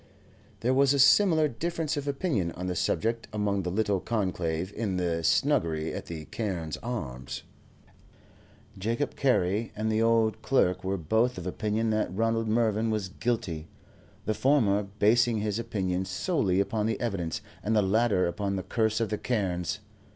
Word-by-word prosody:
There 125 +3 +2
was 140 +1 +4
a - - +1
similar 160 +3 +5
difference 160 +4 -2
of 145 -1 -4
opinion 135 - -1
on 90 - -6
the 90 -1 -2
subject 115 +6 0
among 105 -2 0
the 90 - -3
little 100 0 +1
conclave 90 -4 -2
in 105 -5 -2
the 85 -2 -1
snuggery 85 - +1
at - - -6
the 80 -2 -6
"Carne's 90 -8 -3
Arms." 70 - -5 1.4
Jacob 115 +8 -1
Carey 110 -4 +1
and 110 +1 -1
the 110 +1 +1
old 115 -1 +2
clerk 90 -9 +2
were 95 +1 -1
both 110 +9 +1
of 90 - -6
opinion 110 +4 -1
that 110 0 0
Ronald 115 +3 0
Mervyn 110 0 +1
was 105 -4 -1
guilty, 90 -8 -2 0.6
the 110 - +1
former 110 -6 +3 0.2
basing 115 +1 +3
his 105 +1 -1
opinion 95 -5 -1
solely 95 - 0
upon 105 +2 0
the 115 - -1
evidence, 95 -9 -2 0.2
and 110 +2 0
the 105 - +4
latter 105 -1 +2
upon 100 +3 -2
the 95 - -3
curse 110 -1 0
of 115 - 0
the 105 - -2
Carnes. 95 -4 -1
105 Hz, 160 wpm, -28 LUFS, 90-115 Hz, 1.4 s, similar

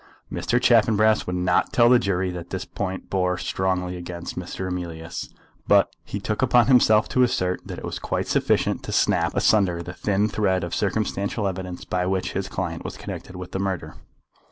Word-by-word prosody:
Mr. 125 0 0
Chaffanbrass 110 -3 +4
would 90 - -2
not 90 0 +1
tell 120 -1 +5
the 125 0 +6
jury 95 -4 0
that 85 -1 -7
this 95 -1 -4
point 95 -2 -5
bore 90 -1 +1
strongly 90 -1 -1
against 85 -1 -6
Mr. 90 +1 -5
Emilius, 85 -2 -5 0.4
but - - +4
he 100 - -5
took 105 +2 -2
upon 125 -2 +5
himself 115 -4 +5
to 130 - +1
assert 95 -8 +1
that - - -6
it - - -7
was - - -4
quite - - -2
sufficient - - +1
to - - -6
snap - - +2
asunder 90 -5 +2
the 90 - -7
thin 100 +3 +1
thread 95 -4 0
of 85 - -4
circumstantial 100 0 -1
evidence 90 -1 -5
by 90 0 -1
which 95 -1 -1
his 95 0 -2
client - - -4
was - - -6
connected 90 - -7
with 90 0 -8
the 95 - -3
murder. 95 -2 -3
95 Hz, 185 wpm, -24 LUFS, 90-105 Hz, 0.4 s, the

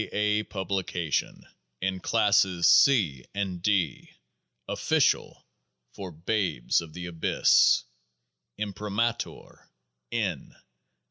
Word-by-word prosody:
A.. 105 0 +1
PUBLICATION 95 -6 -3 0.3
IN 95 0 -2
CLASSES 95 -4 +2
C 90 - +4
AND 95 -3 -3
D 90 -8 0 0.6
Official - - 0 0.5
for 95 -2 -7
Babes 85 - -1
of 80 -2 -11
the 90 +1 -7
Abyss 85 -2 +3 0.7
Imprimatur. 105 +3 -4 0.4
N. - - -3
95 Hz, 80 wpm, -27 LUFS, 85-105 Hz, 0.7 s, C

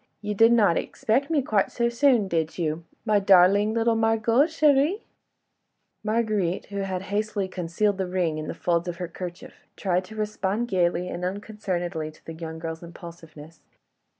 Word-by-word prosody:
You 210 0 -3
did 225 +3 +5
not 210 -8 +4
expect 265 +7 -1
me 300 -4 +1
quite 210 -6 +1
so 235 -1 0
soon, 235 -3 +3
did 160 -3 -1
you, 165 -1 -2 0.2
my 210 -2 +3
darling 195 +2 +5
little 230 0 +2
Margot 225 +4 +3
chérie?" 310 +4 +2 1.0
Marguerite, 215 -5 0
who 200 - -5
had 190 -1 -3
hastily 210 -2 -1
concealed 185 +3 -1
the 190 - -1
ring 175 -4 -1
in 155 - -5
the - - -5
folds 170 0 0
of 175 - -3
her 180 0 -4
kerchief, 175 0 -8 0.2
tried 185 -2 0
to 220 - -12
respond 215 +1 -2
gaily 180 -1 +1
and 175 0 -5
unconcernedly 180 -4 -3
to - - -23
the 165 - -7
young 160 0 -7
girl's 160 0 -6
impulsiveness. 165 -2 -12
195 Hz, 165 wpm, -25 LUFS, 170-220 Hz, 1.0 s, did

